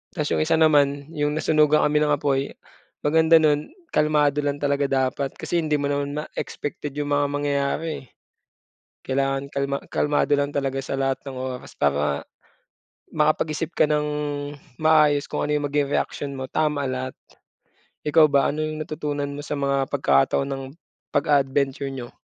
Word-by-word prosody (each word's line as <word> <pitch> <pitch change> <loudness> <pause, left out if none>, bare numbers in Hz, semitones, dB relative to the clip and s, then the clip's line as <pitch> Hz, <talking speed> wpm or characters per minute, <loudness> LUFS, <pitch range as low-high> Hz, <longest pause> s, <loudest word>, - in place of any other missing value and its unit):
Ta's 150 -4 -1
'yung - - +1
isa 160 +1 +2
naman, 145 -3 +3
'yung 150 -1 -1
nasunugan 155 -1 +3
kami 150 0 +2
ng 150 - +2
apoy, 140 -1 +1 0.6
maganda 160 +2 +5
nun, 150 -2 +2 0.2
kalmado 150 -1 +3
lang 145 -1 -1
talaga 140 -1 0
dapat, 135 +1 0
kasi 175 - -1
hindi 155 -2 +1
mo 145 - -2
naman 145 +1 -2
ma 150 - -3
expected 145 0 -5
'yung 145 0 -1
mga 145 0 +3
mangyayari, 145 +2 -1
eh. - - -16 0.9
Kailangan 135 +1 -1
kalma 140 0 -2
kalmado 145 0 +1
lang 140 0 0
talaga 135 -1 -2
sa 135 - -3
lahat 135 0 -1
ng 135 -2 -7
oras 130 -1 -5
para 70 0 +1 0.9
makapag-isip 155 +1 +1
ka 155 - +3
ng 150 0 +1 0.8
maayos 150 -2 +4
kung - - -1
ano 150 - +1
'yung 145 -1 0
maging 145 -1 +1
reaksyon 140 -1 -2
mo, 130 - -5
tama 150 -2 0
lahat. 130 -1 -3 0.9
Ikaw 155 0 +5
ba, 140 -1 +3
ano 155 +2 -1
'yung 155 0 -3
natutunan 150 -2 -3
mo 145 - -6
sa 145 0 -4
mga 140 -1 0
pagkakataon 130 - +2
ng 135 -1 -4 0.5
pag-a-adventure 140 -1 +1
niyo? 130 -3 -8
145 Hz, 160 wpm, -24 LUFS, 140-150 Hz, 0.9 s, maganda